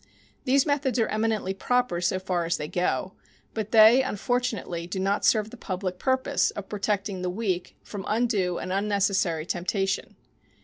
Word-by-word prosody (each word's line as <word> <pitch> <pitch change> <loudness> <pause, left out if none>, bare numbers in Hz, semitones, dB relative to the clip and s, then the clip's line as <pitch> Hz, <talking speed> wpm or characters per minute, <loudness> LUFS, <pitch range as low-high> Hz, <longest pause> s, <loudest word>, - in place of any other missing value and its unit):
These 270 +1 +4
methods 285 -4 0
are 225 - +3
eminently 215 -3 0
proper 245 -3 0
so 180 +1 +1
far 185 -2 -1
as 165 - 0
they 150 - -4
go, 180 +3 -1 0.4
but 215 -2 -3
they, 225 +3 +7
unfortunately, 225 -7 -2
do 190 +2 -4
not 195 +2 0
serve 215 -1 +3
the 245 - -10
public 185 -4 -4
purpose 260 -1 +1
of 200 -1 -7
protecting 200 -2 -2
the 180 - -1
weak 185 -2 -3
from 200 -3 -7
undue 210 -6 +1
and 185 - -4
unnecessary 195 -5 +1
temptation. 190 +2 -2
200 Hz, 160 wpm, -26 LUFS, 185-225 Hz, 0.4 s, they